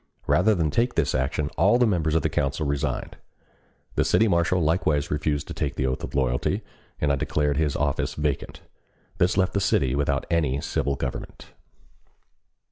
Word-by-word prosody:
Rather 105 Hz, +5 st, +3 dB
than 80 Hz, -4 st, 0 dB
take 120 Hz, -, +1 dB
this 85 Hz, -, +1 dB
action 70 Hz, +3 st, -1 dB
all 100 Hz, +9 st, +4 dB
the 125 Hz, -, +4 dB
members 80 Hz, -7 st, +1 dB
of 80 Hz, -, +2 dB
the -, -, +3 dB
council 75 Hz, +2 st, -1 dB
resigned. 70 Hz, -1 st, -2 dB, 0.8 s
The -, -, +2 dB
city 110 Hz, -, +3 dB
marshal 85 Hz, -1 st, +2 dB
likewise 80 Hz, -3 st, +1 dB
refused 75 Hz, -1 st, -1 dB
to -, -, -4 dB
take -, -, -3 dB
the 65 Hz, -, -1 dB
oath 65 Hz, 0 st, -2 dB
of -, -, -6 dB
loyalty, 65 Hz, -3 st, 0 dB, 0.4 s
and 75 Hz, -, +1 dB
I -, -, +3 dB
declared 75 Hz, +1 st, 0 dB
his 75 Hz, -3 st, 0 dB
office 75 Hz, -1 st, -1 dB
vacant. 75 Hz, -2 st, -3 dB, 0.6 s
This 90 Hz, +2 st, +2 dB
left 95 Hz, -1 st, +2 dB
the 100 Hz, -, 0 dB
city 70 Hz, -9 st, +2 dB
without 70 Hz, 0 st, 0 dB
any 75 Hz, -5 st, +1 dB
civil 70 Hz, 0 st, -1 dB
government. 65 Hz, -, -6 dB
75 Hz, 175 wpm, -25 LUFS, 70-85 Hz, 0.8 s, all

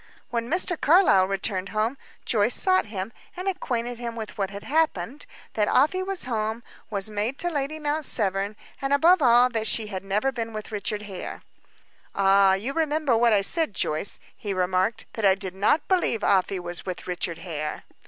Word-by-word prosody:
When 235 Hz, 0 st, -2 dB
Mr. 355 Hz, 0 st, 0 dB
Carlyle 300 Hz, -, +5 dB
returned 195 Hz, 0 st, -2 dB
home 220 Hz, +4 st, 0 dB, 0.3 s
Joyce 220 Hz, +1 st, +2 dB
sought 370 Hz, -, +2 dB
him, 205 Hz, +1 st, -5 dB, 0.2 s
and 365 Hz, +2 st, -4 dB
acquainted 245 Hz, -10 st, -2 dB
him 235 Hz, -1 st, -5 dB
with 220 Hz, -2 st, -6 dB
what 195 Hz, -2 st, -1 dB
had 200 Hz, 0 st, -8 dB
happened; 290 Hz, -, -1 dB, 0.3 s
that 210 Hz, -1 st, +1 dB
Afy 310 Hz, +8 st, +3 dB
was 385 Hz, -4 st, -2 dB
come; 220 Hz, -1 st, -2 dB, 0.3 s
was 200 Hz, 0 st, -2 dB
maid 215 Hz, +6 st, -1 dB
to 350 Hz, 0 st, 0 dB
Lady 290 Hz, 0 st, -2 dB
Mount 305 Hz, 0 st, -1 dB
Severn; 200 Hz, -4 st, -1 dB, 0.3 s
and, 275 Hz, +1 st, 0 dB
above 335 Hz, +5 st, +5 dB
all, 245 Hz, -1 st, +6 dB
that 225 Hz, -2 st, -1 dB
she 220 Hz, -, +1 dB
had 190 Hz, -, -4 dB
never 210 Hz, +7 st, 0 dB
been 230 Hz, -3 st, -5 dB
with 215 Hz, 0 st, -6 dB
Richard 210 Hz, 0 st, -3 dB
Hare. 195 Hz, -3 st, -7 dB, 0.7 s
"Ah! 195 Hz, 0 st, +5 dB
You 225 Hz, +8 st, -3 dB
remember 305 Hz, -4 st, +1 dB
what 235 Hz, +1 st, +4 dB
I 205 Hz, -2 st, +4 dB
said, 310 Hz, -, +2 dB
Joyce," 155 Hz, +6 st, -1 dB, 0.2 s
he 200 Hz, -2 st, -4 dB
remarked. 185 Hz, +3 st, 0 dB
"That 220 Hz, -, -5 dB
I 195 Hz, -1 st, +5 dB
did 190 Hz, -2 st, -4 dB
not 205 Hz, +11 st, +1 dB
believe 350 Hz, -, +1 dB
Afy 190 Hz, 0 st, +2 dB
was 175 Hz, -1 st, -5 dB
with 185 Hz, -2 st, -6 dB
Richard 175 Hz, -2 st, -3 dB
Hare." 155 Hz, -3 st, -5 dB
220 Hz, 185 wpm, -25 LUFS, 195-275 Hz, 0.7 s, all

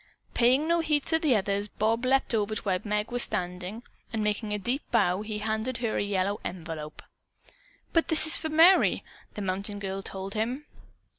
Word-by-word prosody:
Paying 255 Hz, +6 st, +3 dB
no 340 Hz, 0 st, +2 dB
heed 300 Hz, -3 st, 0 dB
to 320 Hz, -, +2 dB
the 300 Hz, -6 st, +2 dB
others, 200 Hz, 0 st, -1 dB
Bob 225 Hz, +4 st, -1 dB
leaped 265 Hz, 0 st, +2 dB
over 215 Hz, -1 st, 0 dB
to -, -, -3 dB
where 185 Hz, -3 st, 0 dB
Meg 210 Hz, +2 st, -2 dB
was 245 Hz, 0 st, +4 dB
standing, 185 Hz, +3 st, -1 dB, 0.3 s
and 220 Hz, -2 st, -2 dB
making 210 Hz, +1 st, -2 dB
a 210 Hz, -, 0 dB
deep 245 Hz, +8 st, -2 dB
bow, 190 Hz, -5 st, +2 dB
he 215 Hz, 0 st, -5 dB
handed 220 Hz, +3 st, -2 dB
her 230 Hz, -2 st, -2 dB
a -, -, 0 dB
yellow 200 Hz, 0 st, -1 dB
envelope. 160 Hz, -4 st, -7 dB, 0.9 s
"But 330 Hz, -, +2 dB
this 315 Hz, -1 st, +5 dB
is 315 Hz, -, +6 dB
for 315 Hz, -, 0 dB
Merry," 330 Hz, +5 st, +5 dB, 0.3 s
the 210 Hz, -, -5 dB
mountain 195 Hz, +2 st, -2 dB
girl 195 Hz, -1 st, -4 dB
told 195 Hz, 0 st, -6 dB
him. 245 Hz, +7 st, -3 dB
215 Hz, 190 wpm, -27 LUFS, 195-255 Hz, 0.9 s, is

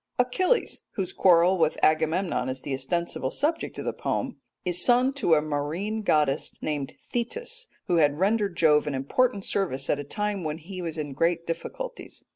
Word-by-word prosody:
Achilles, 365 Hz, -, +1 dB
whose 185 Hz, -2 st, -3 dB
quarrel 180 Hz, 0 st, +5 dB
with 160 Hz, -1 st, +2 dB
Agamemnon 160 Hz, -3 st, +2 dB
is 130 Hz, 0 st, -4 dB
the 140 Hz, -, -3 dB
ostensible 135 Hz, +1 st, -1 dB
subject 310 Hz, -, -1 dB
of -, -, -5 dB
the -, -, -1 dB
poem, -, -, -2 dB, 0.3 s
is 180 Hz, 0 st, +2 dB
son 250 Hz, +2 st, +4 dB
to 220 Hz, -12 st, +3 dB
a 150 Hz, -, +2 dB
marine 155 Hz, +9 st, -2 dB
goddess 150 Hz, -8 st, +1 dB
named 145 Hz, -3 st, -3 dB
Thetis, 470 Hz, -, -3 dB, 0.2 s
who 175 Hz, -, +1 dB
had 145 Hz, -1 st, +3 dB
rendered 200 Hz, -2 st, +1 dB
Jove 150 Hz, -2 st, +4 dB
an 145 Hz, -, -1 dB
important 200 Hz, -, +1 dB
service 135 Hz, -9 st, 0 dB
at 145 Hz, -, 0 dB
a -, -, -3 dB
time 205 Hz, +5 st, -3 dB
when 155 Hz, 0 st, -3 dB
he 180 Hz, +3 st, -8 dB
was 165 Hz, -2 st, -4 dB
in 145 Hz, -3 st, -4 dB
great 170 Hz, +3 st, +1 dB
difficulties. -, -, -5 dB
170 Hz, 175 wpm, -26 LUFS, 150-210 Hz, 0.3 s, quarrel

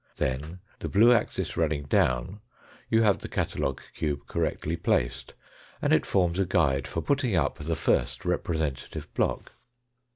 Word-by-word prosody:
Then 75 Hz, +8 st, -2 dB, 0.2 s
the -, -, -4 dB
blue 115 Hz, +5 st, +6 dB
axis 120 Hz, -, -1 dB
running 80 Hz, -3 st, 0 dB
down 65 Hz, +6 st, +1 dB, 0.5 s
you 115 Hz, 0 st, +4 dB
have 105 Hz, -3 st, +3 dB
the -, -, -7 dB
catalogue 70 Hz, -, -2 dB
cube 75 Hz, -2 st, -2 dB
correctly 80 Hz, +2 st, -2 dB
placed, 60 Hz, -7 st, -1 dB, 0.4 s
and -, -, +2 dB
it -, -, +3 dB
forms 90 Hz, -1 st, +1 dB
a 95 Hz, -, +3 dB
guide 70 Hz, -7 st, +2 dB
for 80 Hz, +3 st, -3 dB
putting 135 Hz, -, +1 dB
up 80 Hz, -, 0 dB
the 80 Hz, +2 st, -2 dB
first -, -, 0 dB
representative 80 Hz, -5 st, -2 dB
block. -, -, -1 dB
80 Hz, 150 wpm, -27 LUFS, 70-95 Hz, 0.5 s, blue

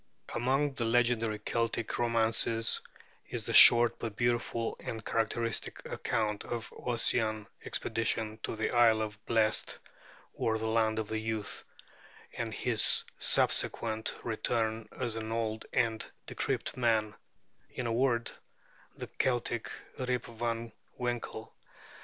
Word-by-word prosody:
Among 135 Hz, +4 st, +1 dB
the 130 Hz, -, -3 dB
legendary 115 Hz, -2 st, +2 dB
Celtic 115 Hz, +1 st, -2 dB
romances 115 Hz, -1 st, +2 dB, 0.5 s
is -, -, -4 dB
the -, -, -3 dB
short 120 Hz, 0 st, +9 dB
but 110 Hz, -3 st, -4 dB
beautiful 120 Hz, -1 st, 0 dB
and 110 Hz, -1 st, -6 dB
characteristic 115 Hz, 0 st, -1 dB
account 105 Hz, -2 st, -2 dB
of 120 Hz, -1 st, -5 dB
Ossian's 110 Hz, -3 st, 0 dB, 0.2 s
expedition 110 Hz, -1 st, -1 dB
to -, -, -3 dB
the 110 Hz, -, -1 dB
Isle 115 Hz, -2 st, +5 dB
of 105 Hz, -1 st, -4 dB
the 105 Hz, -, -20 dB
Blest 110 Hz, -1 st, +1 dB, 0.6 s
or 110 Hz, -1 st, 0 dB
the 110 Hz, -, -4 dB
Land 110 Hz, -1 st, +1 dB
of 110 Hz, -1 st, -3 dB
Youth, 110 Hz, -1 st, -3 dB, 0.7 s
and -, -, -3 dB
his -, -, +2 dB, 0.2 s
subsequent 110 Hz, -1 st, +1 dB
return 110 Hz, -1 st, -1 dB
as 120 Hz, -3 st, -2 dB
an 110 Hz, 0 st, -4 dB
old 110 Hz, -1 st, -2 dB
and 110 Hz, -1 st, +1 dB, 0.2 s
decrepit -, -, -2 dB
man 110 Hz, -4 st, +1 dB, 0.6 s
in 125 Hz, -, -5 dB
a 115 Hz, -, 0 dB
word, 120 Hz, -1 st, +1 dB, 0.7 s
the -, -, -5 dB
Celtic 120 Hz, -2 st, -1 dB, 0.3 s
Rip 125 Hz, -1 st, -1 dB
Van 115 Hz, 0 st, -3 dB, 0.3 s
Winkle. 120 Hz, -2 st, -4 dB
115 Hz, 125 wpm, -31 LUFS, 110-120 Hz, 0.7 s, short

